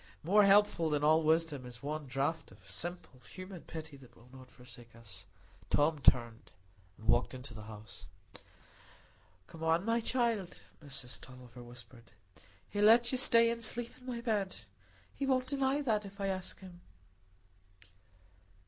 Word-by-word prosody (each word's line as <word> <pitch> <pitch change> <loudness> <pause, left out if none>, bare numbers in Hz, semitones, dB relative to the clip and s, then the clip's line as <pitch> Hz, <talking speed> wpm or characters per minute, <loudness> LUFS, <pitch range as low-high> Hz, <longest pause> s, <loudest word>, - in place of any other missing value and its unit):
More 200 +5 +5
helpful 200 -5 +4
than 150 -1 0
all 155 +2 +5
wisdom 160 -3 +1
is 125 0 -10
one 150 0 -4
draught 140 +5 -2
of - - -18
simple 175 -6 -6
human 185 -2 -9
pity 160 -3 -9
that 130 -3 -17
will 120 +2 -19
not 130 -1 -13
forsake 120 -2 -12
us. 100 -5 -11 0.4
Tom 150 +1 +2
turned 120 -4 +2 0.5
and 110 - -14
walked 120 +3 +2
into 125 -1 -8
the 110 - -9
house. 105 -9 -11 1.4
"Come 160 +10 -13
in, 165 +3 +2
my 230 +1 +2
child," 230 -6 0 0.2
Mrs 135 -4 -8
Tulliver 125 -1 -12
whispered. 120 -1 -14 0.5
"He'll 205 0 +1
let 235 +2 +6
you 260 - 0
stay 230 -2 +5
and 235 0 -4
sleep 235 +2 0
in 255 - -15
my 240 -2 -4
bed. 210 -5 -1 0.6
He 275 - -3
won't 255 -1 +2
deny 275 +1 0
that 215 -5 +1
if 200 0 -11
I 195 0 -1
ask 185 0 -4
him." 180 -2 -12
160 Hz, 155 wpm, -33 LUFS, 125-210 Hz, 1.4 s, let